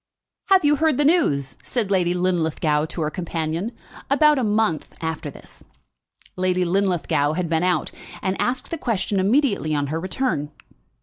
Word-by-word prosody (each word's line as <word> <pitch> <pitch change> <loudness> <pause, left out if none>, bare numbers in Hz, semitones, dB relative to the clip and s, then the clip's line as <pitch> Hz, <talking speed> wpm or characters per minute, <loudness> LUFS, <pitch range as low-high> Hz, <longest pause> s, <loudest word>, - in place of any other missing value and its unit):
"Have 380 -4 +4
you 295 0 +4
heard 315 -3 +2
the 290 - +2
news?" 145 - +2
said 220 -6 -2
Lady 180 -2 +2
Linlithgow 160 -4 +1
to 160 - -6
her 155 0 -1
companion 165 +3 -3 0.4
about 295 +1 +4
a - - 0
month 210 -7 0
after 160 -2 -4
this. - - -13 0.7
Lady 185 0 +1
Linlithgow 170 -5 +1
had 175 +1 -1
been 160 0 +1
out, 180 -4 0 0.3
and 190 0 0
asked 255 +1 -2
the 330 - -3
question 200 -5 -1
immediately 200 - +2
on 145 -1 0
her 160 - -1
return. 185 - -2
185 Hz, 160 wpm, -22 LUFS, 160-245 Hz, 0.7 s, Have